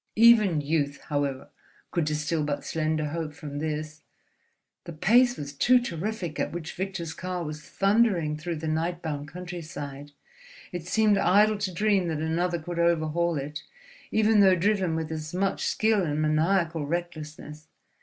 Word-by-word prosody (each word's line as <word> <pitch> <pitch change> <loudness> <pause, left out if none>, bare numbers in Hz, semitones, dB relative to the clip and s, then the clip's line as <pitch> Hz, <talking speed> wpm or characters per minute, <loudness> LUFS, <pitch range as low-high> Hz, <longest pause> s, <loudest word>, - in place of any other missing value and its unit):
Even 215 -8 +6
youth, 145 -1 -1
however, 140 -3 -2 0.4
could 170 -4 0
distill 150 +1 -1
but 145 -1 -3
slender 155 -1 -1
hope 155 -1 -4
from 145 -2 -6
this. 155 0 -4 0.8
The 170 - -7
pace 245 +10 +4
was 145 -1 -6
too 250 - +4
terrific 185 -5 -4
at - - -1
which 170 -1 -6
Victor's 185 -3 -4
car 180 0 -4
was 155 -1 -6
thundering 195 -6 +2
through 170 +3 -4
the 160 +1 -5
night 165 +3 -1
bound 145 -3 -4
countryside, 155 -5 -7 0.6
it 175 -1 -6
seemed 210 +1 +3
idle 210 +2 +4
to 200 -2 -2
dream 195 0 +1
that 160 -2 -1
another 170 +3 0
could 170 +1 -5
overhaul 170 0 +1
it, 145 +2 -5 0.5
even 220 0 +3
though 190 -2 +6
driven 185 -2 +1
with 160 0 -3
as 155 +1 -5
much 195 +1 0
skill 220 -1 +2
and 150 -2 -1
maniacal 160 0 +1
recklessness. 155 -2 -5
165 Hz, 155 wpm, -27 LUFS, 155-190 Hz, 0.8 s, Even